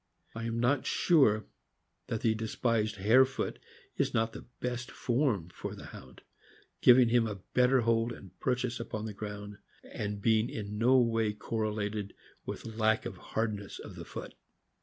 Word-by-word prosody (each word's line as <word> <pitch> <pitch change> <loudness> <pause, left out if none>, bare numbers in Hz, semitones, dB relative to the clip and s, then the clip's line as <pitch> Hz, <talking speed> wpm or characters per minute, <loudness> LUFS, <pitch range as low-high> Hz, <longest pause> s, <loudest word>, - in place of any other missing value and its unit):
I 115 0 -5
am 115 0 -2
not 125 +3 +2
sure 135 - +4 0.6
that 110 - -2
the 110 - +3
despised 110 0 0
hare 110 +7 +6
foot 135 +1 -3 0.4
is - - 0
not 115 0 +1
the - - -10
best 125 0 -3
form 120 - 0
for - - -6
the - - -10
Hound; - - -12 0.6
giving 125 -1 +7
him 115 -1 +3
a 100 -3 -6
better 125 +1 +4
hold 115 0 +2
and 95 -6 -10
purchase 125 -1 -1
upon 110 -2 -4
the 110 - -5
ground, 105 -1 -7 0.2
and 105 -1 -4
being 110 +2 +3
in 105 -1 -5
no 125 +3 +5
way 115 -3 +2
correlated 105 -2 -3 0.3
with - - -5
lack 110 -1 +1
of - - -5
hardness 105 -3 -3
of - - -9
the - - -8
foot. - - -7
115 Hz, 160 wpm, -31 LUFS, 105-120 Hz, 0.6 s, giving